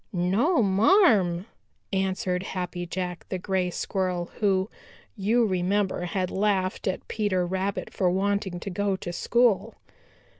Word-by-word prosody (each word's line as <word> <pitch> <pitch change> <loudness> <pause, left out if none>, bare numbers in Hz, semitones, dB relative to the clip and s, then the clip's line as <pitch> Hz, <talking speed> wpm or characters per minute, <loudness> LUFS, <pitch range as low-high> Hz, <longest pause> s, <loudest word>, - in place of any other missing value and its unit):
"No, 215 - +2
marm," 195 - +4 0.5
answered 190 -1 0
Happy 180 -1 -4
Jack 180 0 -4
the 185 - -2
Gray 185 -1 -1
Squirrel, 180 -1 -2
who, 190 -2 +2 0.5
you 225 +4 +2
remember, 190 -1 0
had 185 +1 -2
laughed 195 -2 0
at 190 - -3
Peter 200 -4 0
Rabbit 190 +2 -3
for 185 -2 +2
wanting 195 0 0
to 195 - -5
go 200 +1 0
to 175 -2 -6
school. 235 +2 +2
190 Hz, 125 wpm, -26 LUFS, 180-205 Hz, 0.5 s, marm